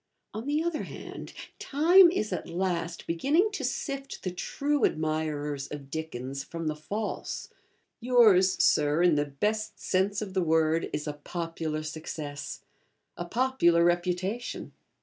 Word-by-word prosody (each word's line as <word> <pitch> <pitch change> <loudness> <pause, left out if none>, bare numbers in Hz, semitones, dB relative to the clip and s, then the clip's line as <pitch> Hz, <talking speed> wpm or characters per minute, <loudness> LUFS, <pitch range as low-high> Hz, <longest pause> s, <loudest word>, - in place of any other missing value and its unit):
On 220 +5 -5
the 300 +2 +1
other 335 -2 -1
hand, - - -8 0.3
Time 350 +1 +6
is 215 - -1
at 180 - -4
last 175 -1 -2
beginning 300 - +2
to 360 -9 -4
sift 275 +2 -4
the 185 - -2
true 285 +10 -1
admirers 155 -2 -1
of 140 -2 -8
Dickens 140 -4 -4
from 165 +3 -6
the 155 -1 -1
false. 205 +8 -4 0.5
Yours, 220 -7 +5
Sir, 150 +3 +3
in 175 -2 +5
the 145 0 +2
best 210 +10 -2
sense 195 +2 +1
of 205 -3 -5
the 190 - +1
word, 160 -1 +2
is 150 - -3
a 150 - -3
popular 160 0 -4
success, 155 -2 -6 0.5
a 175 - -5
popular 175 -6 +3
reputation. 180 +6 -1
175 Hz, 140 wpm, -28 LUFS, 155-230 Hz, 0.5 s, Time